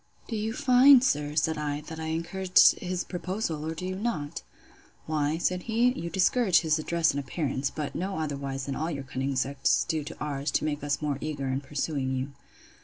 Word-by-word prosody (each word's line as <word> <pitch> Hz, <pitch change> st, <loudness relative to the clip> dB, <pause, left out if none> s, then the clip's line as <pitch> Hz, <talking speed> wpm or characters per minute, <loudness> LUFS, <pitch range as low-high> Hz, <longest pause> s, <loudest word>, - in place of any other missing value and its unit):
Do 230 Hz, -, -4 dB
you 220 Hz, +1 st, -2 dB
find, 255 Hz, +1 st, +6 dB
sir, 150 Hz, -, 0 dB
said 160 Hz, 0 st, +1 dB
I, 145 Hz, -1 st, -2 dB
that 160 Hz, +1 st, -8 dB
I 160 Hz, -, -4 dB
encouraged 170 Hz, +4 st, +3 dB
his 180 Hz, 0 st, -2 dB
proposal, 180 Hz, -3 st, -3 dB
or 160 Hz, +1 st, -3 dB
do 180 Hz, -, -5 dB
you 185 Hz, -, -2 dB
not? 190 Hz, -9 st, -3 dB, 0.6 s
Why, 155 Hz, 0 st, 0 dB
said 180 Hz, +1 st, 0 dB
he, 235 Hz, +3 st, +3 dB
you 170 Hz, -9 st, -5 dB
discourage 190 Hz, +1 st, +3 dB
his 160 Hz, -1 st, +1 dB
address 170 Hz, +1 st, +1 dB
in 140 Hz, -, -2 dB
appearance; 140 Hz, -1 st, -2 dB
but 150 Hz, -1 st, -5 dB
no 190 Hz, +1 st, -3 dB
otherwise 140 Hz, -3 st, -3 dB
than 140 Hz, -, -3 dB
all 160 Hz, +2 st, -2 dB
your 140 Hz, -4 st, -4 dB
cunning 135 Hz, +1 st, -3 dB
sex 135 Hz, +2 st, +1 dB
do 160 Hz, -2 st, -1 dB
to -, -, -8 dB
ours, 145 Hz, -1 st, -2 dB
to -, -, +1 dB
make 145 Hz, -1 st, -2 dB
us 145 Hz, +1 st, -1 dB
more 145 Hz, -2 st, -1 dB
eager 145 Hz, -3 st, -3 dB
in 130 Hz, +1 st, -1 dB
pursuing 140 Hz, -1 st, -2 dB
you. 130 Hz, +2 st, -3 dB
155 Hz, 200 wpm, -28 LUFS, 140-180 Hz, 0.6 s, find